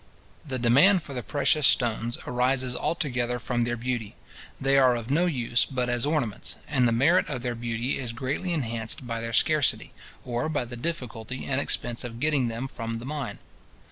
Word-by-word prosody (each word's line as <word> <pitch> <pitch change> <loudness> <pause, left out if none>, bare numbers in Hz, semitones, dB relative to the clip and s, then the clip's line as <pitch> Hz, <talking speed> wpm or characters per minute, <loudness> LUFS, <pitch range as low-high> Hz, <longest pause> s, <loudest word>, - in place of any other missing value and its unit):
The 135 -3 -3
demand 140 +10 +5
for 140 - -7
the 125 - -3
precious 145 +2 +2
stones 120 -1 +2
arises 125 0 +1
altogether 125 -8 -1
from 120 0 -1
their 120 0 -2
beauty. 120 -3 -3 0.4
They 135 +1 +3
are 130 -2 +5
of 120 +2 -5
no 170 +5 +3
use 120 -6 +1
but 125 -2 -2
as 120 +3 +1
ornaments; 145 -9 -1
and 130 -4 +3
the - - +2
merit 145 +11 +3
of 130 -4 -4
their 125 -1 -1
beauty 120 +2 -2
is 125 -3 -3
greatly 135 +9 -3
enhanced 115 -5 -2
by 115 -1 -3
their 115 0 -4
scarcity, 150 +5 +2 0.3
or 120 +5 -2
by 145 -5 -1
the 120 +1 -8
difficulty 125 -4 -5
and 135 0 0
expense 120 -3 0
of 115 -1 -7
getting 145 -3 +2
them 115 +3 -4
from 115 -3 -5
the 115 - -8
mine. 145 -2 -4
125 Hz, 185 wpm, -26 LUFS, 120-140 Hz, 0.4 s, demand